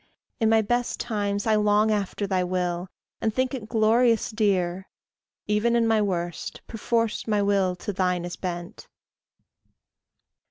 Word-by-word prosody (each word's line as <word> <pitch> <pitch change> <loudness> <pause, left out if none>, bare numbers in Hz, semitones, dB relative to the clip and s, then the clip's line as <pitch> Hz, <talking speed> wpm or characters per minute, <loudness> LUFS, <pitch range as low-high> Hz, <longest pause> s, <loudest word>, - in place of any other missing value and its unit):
In 225 -2 +3
my 220 0 +4
best 240 +3 -1
times 205 -2 -2
I 220 - +3
long 210 0 +3
After 205 -1 -1
thy 190 -2 0
will, 180 0 -2 0.3
and 220 - +1
think 255 +3 -1
it 225 -5 -6
glorious 230 +1 +3
dear; 190 -4 0 0.6
Even 210 +3 +1
in 235 -1 +3
my 225 -1 +3
worst, 175 -4 -3
perforce 230 0 -1
my 210 -2 +2
will 195 -2 +2
to 200 +3 -5
thine 180 -2 0
is 175 - -5
bent. 175 -1 -6
210 Hz, 145 wpm, -25 LUFS, 185-225 Hz, 0.6 s, my